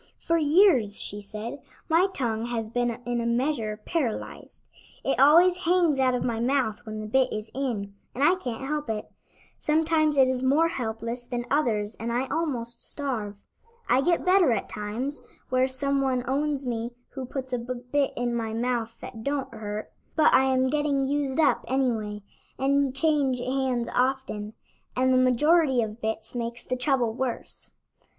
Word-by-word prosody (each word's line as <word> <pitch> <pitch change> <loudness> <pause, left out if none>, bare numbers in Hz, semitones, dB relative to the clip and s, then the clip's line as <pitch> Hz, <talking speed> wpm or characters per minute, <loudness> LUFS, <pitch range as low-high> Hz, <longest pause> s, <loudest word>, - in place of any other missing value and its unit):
"For 335 0 +1
years," 295 - +4
she 205 +1 -3
said, 215 +7 -7 0.3
"my 340 +3 +4
tongue 230 -8 -2
has 225 -2 -3
been 245 0 +1 0.2
in 240 -1 -1
a - - -3
measure 235 -3 0
paralyzed. 285 -11 -3 0.4
It 270 - 0
always 340 +6 +6
hangs 345 -5 +2
out 255 -1 +3
of 245 - -1
my 230 -2 -1
mouth 240 -2 0
when 215 0 -5
the - - -5
bit 260 +4 +2
is 215 +1 -5
in, 230 -7 -3 0.2
and 265 - 0
I 325 +5 +6
can't 265 -8 -4
help 295 -3 -2
it. 215 -1 -4 0.5
Sometimes 310 -1 +2
it 265 -1 +6
is 255 -1 -1
more 290 +6 +3
helpless 230 -3 -4
than 240 -1 -3
others 225 -7 +1
and 230 +1 -3
I 245 +3 0
almost 250 -7 -2
starve. 235 -8 -3 0.5
I 255 - +4
get 345 +4 +1
better 365 -6 +5
at 215 - -2
times 225 +7 -4 0.3
where 255 0 +3
some 275 +1 0
one 255 -2 0
owns 280 +1 0
me 235 0 -3 0.2
who 265 - -6
puts 260 -1 -5
a 250 - +1
bit 250 +3 -1
in 240 0 -1
my 225 -2 -2
mouth 230 -1 -1
that 225 -2 -8
don't 275 -2 -2
hurt; 215 -1 -5 0.2
but 310 -1 +5
I 265 - +6
am 260 0 +2
getting 290 -2 +1
used 285 0 -1
up 300 -3 +3
anyway, 225 -6 -1 0.3
and 275 0 +1
change 285 -4 +2
hands 255 -1 -1
often, 250 -5 -1 0.4
and 260 +1 +3
the - - +4
majority 260 +1 +4
of 220 +1 -6
bits 220 0 -3
makes 235 -1 -4
the 255 - -2
trouble 250 -3 +1
worse." 255 0 -4
255 Hz, 170 wpm, -26 LUFS, 230-280 Hz, 0.5 s, always